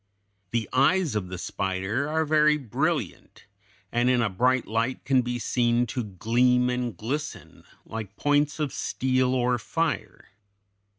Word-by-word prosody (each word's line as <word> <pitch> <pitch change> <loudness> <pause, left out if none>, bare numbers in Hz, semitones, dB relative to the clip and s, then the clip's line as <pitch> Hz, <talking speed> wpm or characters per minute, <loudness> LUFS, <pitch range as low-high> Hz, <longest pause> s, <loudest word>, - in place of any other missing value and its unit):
The 115 -2 -1
eyes 155 +4 +3
of 100 -3 -1
the 90 0 -6
spider 95 +10 -2
are 160 +1 +1
very 150 0 +4
brilliant, 130 -8 -3 0.5
and 120 +1 +2
in 125 -1 +3
a 115 -4 +1
bright 125 +6 +2
light 115 +4 -2
can 135 -2 +3
be 120 0 -3
seen 120 0 +1
to 125 - -2
gleam 125 +5 +2
and 125 -5 -3
glisten 120 - -5 0.2
like 110 -3 -7
points 145 0 +1
of 150 -3 -1
steel 130 0 0
or 125 -1 +1
fire. 135 - -3
125 Hz, 140 wpm, -26 LUFS, 110-140 Hz, 0.5 s, very